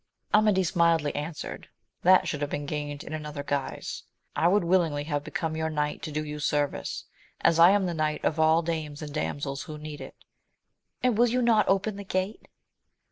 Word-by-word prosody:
Amadis 210 -5 +3
mildly 165 -3 +3
answered, 150 +2 -5 0.3
that 185 +1 +5
should 150 - -3
have 145 - -1
been 145 - -3
gained 145 0 -4
in 155 - -8
another 150 -2 -5
guise: 140 -1 -3 0.3
I 170 - +3
would 200 +2 +3
willingly 170 -5 +2
have 145 -1 -2
become 160 +1 -3
your 160 0 -1
knight 150 -1 -2
to 155 - -5
do 155 +1 -2
you 150 0 -6
service, 145 -1 -1 0.4
as 165 - +3
I 170 +2 +9
am 200 0 +3
the 175 - -1
knight 155 -1 -1
of 160 - 0
all 160 +1 +4
dames 155 -2 -3
and 145 -1 -7
damsels 140 -2 -3
who 155 - -7
need 150 -1 -8
it. - - -9 0.5
— - - -44
And 245 -3 +2
will 240 - +6
you 250 +2 +1
not 225 -3 +4
open 195 +1 +1
the 200 - -6
gate 190 +2 -3
160 Hz, 195 wpm, -27 LUFS, 150-185 Hz, 0.5 s, I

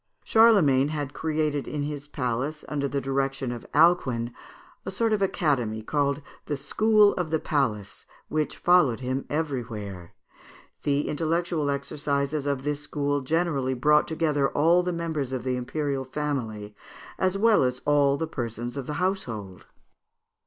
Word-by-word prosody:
Charlemagne 185 - +5
had 145 -2 -4
created 155 -2 -1
in 150 -1 -3
his 145 0 -5
palace, 135 +2 -3
under 140 -1 -1
the 140 0 -1
direction 135 -1 -1
of 120 -1 -7
Alcuin, 135 -8 +3 0.5
a - - -5
sort 220 +4 0
of 210 - 0
academy 135 - 0
called 140 +2 0 0.2
the 145 - -1
"School 210 +9 +4
of 180 -3 -2
the 160 - +2
Palace," 115 -11 -2 0.2
which 155 -1 -2
followed 160 -10 +4
him 130 +1 -2
everywhere. 115 - -4 0.7
The 145 0 0
intellectual 165 0 0
exercises 140 +1 -2
of 140 -2 -1
this 145 0 -1
school 145 -1 -1
generally 140 -3 0
brought 150 +4 +3
together 150 -4 +1
all 165 +4 +4
the 180 0 -2
members 160 -6 -3
of 130 -3 -3
the 130 0 -1
imperial 135 +2 -2
family, 125 -7 -4 0.5
as 185 +1 +1
well 225 +1 +4
as 125 -1 0
all 145 -1 +3
the 160 - -1
persons 120 -3 -5
of 135 - -5
the 150 - -3
household. 120 - -3
145 Hz, 145 wpm, -26 LUFS, 130-160 Hz, 0.7 s, Charlemagne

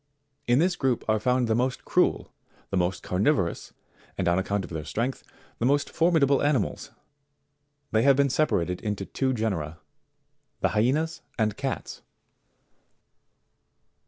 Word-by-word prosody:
In 120 +1 +4
this 175 +4 +2
group 130 -7 -1
are 110 0 +2
found 125 +1 +1
the 110 - +2
most 125 +3 -1
cruel, - - +1 0.4
the - - -1
most 90 0 0
carnivorous, 95 - 0 0.5
and 95 - -1
on 85 +2 +3
account 100 +1 -1
of - - -13
their 80 -2 -4
strength, 115 - -3 0.4
the 115 - 0
most 145 +1 +1
formidable 160 -5 +3
animals; 145 -7 0 1.0
they 110 - +3
have 135 +2 +5
been 140 0 +2
separated 90 - 0
into 105 -2 -3
two 130 +5 -1
genera: 95 -10 -2 0.8
the - - +3
HYENAS 135 +9 0 0.2
and 110 -3 +1
CATS. 135 +2 -4
120 Hz, 135 wpm, -26 LUFS, 95-140 Hz, 1.0 s, have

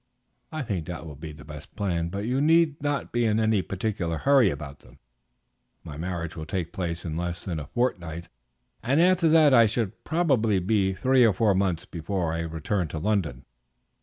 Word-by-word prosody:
"I 155 -2 -3
think 95 -10 -3
that 85 -2 -6
will 75 - -8
be 75 +3 -8
the 75 -1 -13
best 75 -1 -11
plan; 85 -5 -1
but 100 +3 -4
you 125 +4 0
need 160 -1 +3
not 145 -1 -2
be 120 0 +1
in 110 0 +2
any 110 -2 +2
particular 95 -4 -3
hurry 135 - +4
about 70 -2 -7
them. - - -19 0.9
My 75 - -8
marriage 85 +1 -4
will 80 -1 -7
take 85 0 -3
place 85 -4 -4
in 80 -2 -3
less 85 0 -4
than 85 -4 -3
a 70 - -7
fortnight, 85 -9 -2 0.5
and 130 +7 +1
after 180 -1 +4
that 155 -3 +6
I 115 -3 +7
shall 110 -2 -1
probably 135 - +1
be 95 +1 +1
three 130 +3 +3
or 110 -3 +5
four 105 +1 +2
months 95 -2 0
before 90 -1 -3
I 85 - -2
return 85 +3 -2
to 80 - -6
London. 85 - -1
95 Hz, 195 wpm, -26 LUFS, 85-120 Hz, 0.9 s, I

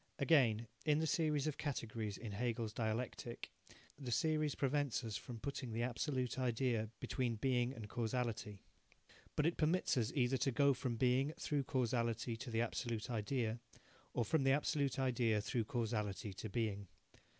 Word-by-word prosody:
Again, 120 -8 +4 0.2
in 150 -1 +3
the 160 - +1
series 155 -5 +2
of 155 -2 -2
categories 115 -7 -3
in 115 -3 -6
Hegel's 115 0 -1
dialectic, 115 +1 -3 0.5
the 130 -4 -5
series 155 +3 +2
prevents 140 -2 +1
us 110 -2 -4
from 120 -2 -6
putting 135 -1 -4
the 115 +1 0
Absolute 130 +1 -1
Idea 120 -3 +1
between 125 -4 -1
Being 125 +1 +1
and 110 -3 -7
Causality. 110 -3 -2 0.7
But 150 - +2
it 170 - +2
permits 165 -1 +2
us 115 0 +1
either 130 -1 +3
to 135 +2 +1
go 140 +2 +4
from 125 -2 -2
Being, 130 +5 +2
through 145 -2 0
Causality, 120 -2 0
to 125 +3 -7
the 115 0 +1
Absolute 120 0 -2
Idea, 115 +1 -1 0.6
or 120 - +2
from 155 +7 +2
the 135 0 +4
Absolute 145 -1 +1
Idea, 120 -5 +2
through 110 +2 -1
Causality, 105 -4 -2
to 105 +3 -6
Being. 100 -3 -1
120 Hz, 160 wpm, -38 LUFS, 115-135 Hz, 0.7 s, Again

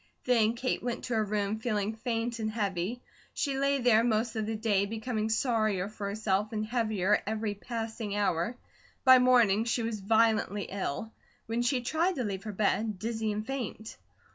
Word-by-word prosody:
Then 230 -3 +3
Kate 255 +2 -1
went 240 -1 -3
to 245 - -3
her 220 -1 +2
room 210 0 -1
feeling 215 -2 -1
faint 230 0 -2
and 215 -1 -1
heavy. 205 +1 -2 0.3
She 275 -2 -1
lay 275 0 +2
there 235 -3 +4
most 225 0 +1
of 215 -1 -2
the 220 - -2
day, 210 -3 +1
becoming 220 0 -2
sorrier 215 -5 +1
for 210 -1 -5
herself, 205 0 0
and 215 -1 -2
heavier 215 -4 +1
every 215 -1 -1
passing 225 -1 -4
hour. 205 +3 0 0.5
By 260 -1 +8
morning 235 -5 +4
she 235 0 0
was 225 -2 -2
violently 215 -1 +2
ill; 195 +2 -3 0.3
when 230 +1 -1
she 250 +1 +1
tried 330 +9 +1
to 255 - -1
leave 195 -2 -4
her 215 - -3
bed, 210 +1 0
dizzy 220 +1 -2
and 210 +1 -3
faint. 240 -4 -5
220 Hz, 175 wpm, -30 LUFS, 210-235 Hz, 0.5 s, By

